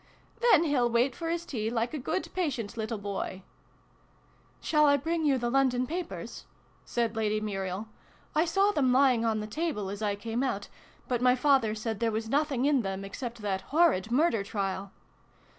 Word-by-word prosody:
" 455 Hz, -, -32 dB
Then 465 Hz, -9 st, +6 dB
he'll 270 Hz, -7 st, +2 dB
wait 240 Hz, +2 st, +2 dB
for 330 Hz, -1 st, -4 dB
his 340 Hz, 0 st, -2 dB
tea. 220 Hz, -7 st, -2 dB
like 235 Hz, +2 st, -1 dB
a 305 Hz, -, -3 dB
good, 320 Hz, +8 st, -2 dB
patient 260 Hz, -, -2 dB
little 220 Hz, 0 st, -3 dB
boy! 200 Hz, -2 st, -4 dB, 0.6 s
" -, -, -34 dB, 0.3 s
"Shall 300 Hz, -1 st, +3 dB
I 285 Hz, 0 st, +5 dB
bring 325 Hz, +3 st, -1 dB
you 275 Hz, -2 st, +3 dB
the 240 Hz, -1 st, -1 dB
London 255 Hz, -2 st, +2 dB
Papers?" 345 Hz, +5 st, -6 dB, 0.4 s
said 235 Hz, -2 st, -1 dB
Lady 215 Hz, -1 st, 0 dB
Muriel. 195 Hz, -1 st, -3 dB, 0.2 s
" -, -, -31 dB
I 310 Hz, -, +4 dB
saw 390 Hz, +4 st, +3 dB
them 270 Hz, -9 st, +2 dB
lying 255 Hz, -3 st, +4 dB
on 220 Hz, -1 st, +1 dB
the -, -, -4 dB
table 215 Hz, -, -3 dB
as 205 Hz, +1 st, -6 dB
I 205 Hz, -2 st, 0 dB
came 225 Hz, +4 st, -3 dB
out, 225 Hz, -7 st, -2 dB, 0.4 s
but 245 Hz, -2 st, -1 dB
my 250 Hz, 0 st, +5 dB
father 260 Hz, -5 st, +3 dB
said 220 Hz, -1 st, -3 dB
there 230 Hz, -1 st, +1 dB
was 220 Hz, +1 st, -3 dB
nothing 280 Hz, -1 st, +1 dB
in 285 Hz, -3 st, +3 dB
them, 195 Hz, -1 st, -4 dB
except 235 Hz, +2 st, -6 dB
that 190 Hz, -2 st, -1 dB
horrid 295 Hz, -, +3 dB
murder 250 Hz, -5 st, +2 dB
trial." 195 Hz, -1 st, -3 dB
240 Hz, 195 wpm, -29 LUFS, 215-290 Hz, 0.6 s, Then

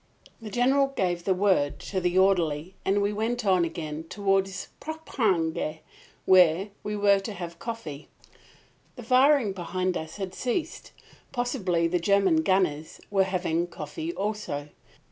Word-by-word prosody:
The 220 Hz, -, -7 dB
General 265 Hz, +5 st, +3 dB
gave 180 Hz, -10 st, -2 dB
the 190 Hz, -, +3 dB
word 185 Hz, -7 st, +2 dB
to 190 Hz, -2 st, -3 dB
the 180 Hz, +1 st, 0 dB
orderly 180 Hz, -3 st, +2 dB
and 200 Hz, +1 st, +2 dB
we 205 Hz, +1 st, 0 dB
went 225 Hz, +3 st, -2 dB
on 185 Hz, -3 st, +4 dB
again 160 Hz, -1 st, -4 dB
toward 195 Hz, -1 st, +1 dB, 0.3 s
Poperinghe, 190 Hz, -, -1 dB, 0.4 s
where 185 Hz, +1 st, +5 dB
we 210 Hz, 0 st, -4 dB
were 200 Hz, -1 st, +4 dB
to 205 Hz, +2 st, -6 dB
have 170 Hz, -3 st, -7 dB
coffee. 195 Hz, -12 st, -6 dB, 0.9 s
The -, -, -9 dB
firing 260 Hz, -4 st, +4 dB
behind 185 Hz, 0 st, -2 dB
us 160 Hz, -1 st, -5 dB
had 190 Hz, -2 st, -5 dB
ceased. 255 Hz, -, -3 dB, 0.4 s
Possibly 190 Hz, -9 st, 0 dB
the 175 Hz, +1 st, 0 dB
German 200 Hz, -, +3 dB
gunners 185 Hz, -, 0 dB
were 195 Hz, -2 st, +3 dB
having 175 Hz, -2 st, -1 dB
coffee 155 Hz, 0 st, -6 dB
also. 195 Hz, -8 st, -3 dB
190 Hz, 140 wpm, -27 LUFS, 170-210 Hz, 0.9 s, where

